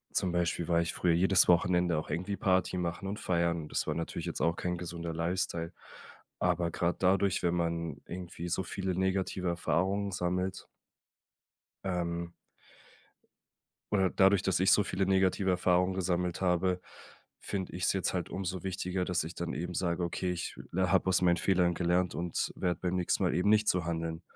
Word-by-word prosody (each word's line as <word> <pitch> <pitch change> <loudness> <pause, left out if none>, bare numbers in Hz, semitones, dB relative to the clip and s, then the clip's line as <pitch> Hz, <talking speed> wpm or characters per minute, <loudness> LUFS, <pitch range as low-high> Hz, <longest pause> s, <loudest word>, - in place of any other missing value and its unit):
Zum 90 - +1
Beispiel 85 -1 0
war 85 -1 +3
ich 85 - -2
früher 85 -2 +2
jedes 95 +2 +4
Wochenende 90 -1 +3
auch 75 - -4
irgendwie 90 +6 -2
Party 95 -2 +1
machen 90 +2 -3
und 100 +2 -4
feiern. 85 -2 0
Das - - -1
war - - -1
natürlich 85 - -4
jetzt - - -4
auch 85 +1 +2
kein 90 -1 -2
gesunder 85 -1 -5
Lifestyle. 85 0 -2 0.7
Aber 90 -1 +1
grad 85 +3 -1
dadurch, 95 0 +3
wenn 85 -1 +2
man 85 -4 -2
irgendwie 90 -1 -6
so 95 +2 0
viele 95 +2 -3
negative 95 -1 0
Erfahrungen 95 +4 0
sammelt 90 0 -2 1.2
ähm 85 -2 -2 1.6
oder 95 -2 +3
dadurch, 95 0 +4
dass 95 -2 +1
ich 95 - +4
so 105 - +5
viele 95 0 -1
negative 95 0 +2
Erfahrungen 90 0 +2
gesammelt 90 -1 -1
habe, 90 0 +1 0.6
finde 95 -2 -4
ich's 90 -1 +1
jetzt 95 -2 -1
halt 90 -2 -2
umso 95 -1 -4
wichtiger, 95 0 -2
dass 90 -3 0
ich 80 +2 -7
dann 85 -5 -4
eben 85 +6 -4
sage: 85 0 -1
„Okay, 90 +1 -2
ich 85 -1 -4 0.2
la 95 +1 +1
habe 95 -1 +3
aus 90 - +3
meinen 85 -1 +4
Fehlern 85 +1 +2
gelernt 90 +1 +1
und 85 0 -2
werde 90 -2 -1
beim 90 0 -1
nächsten 90 -1 +1
Mal - - +2
eben 90 +3 +2
nicht 105 0 +4
so 90 -2 +2
handeln.“ 80 -1 -3
90 Hz, 175 wpm, -31 LUFS, 85-95 Hz, 1.6 s, so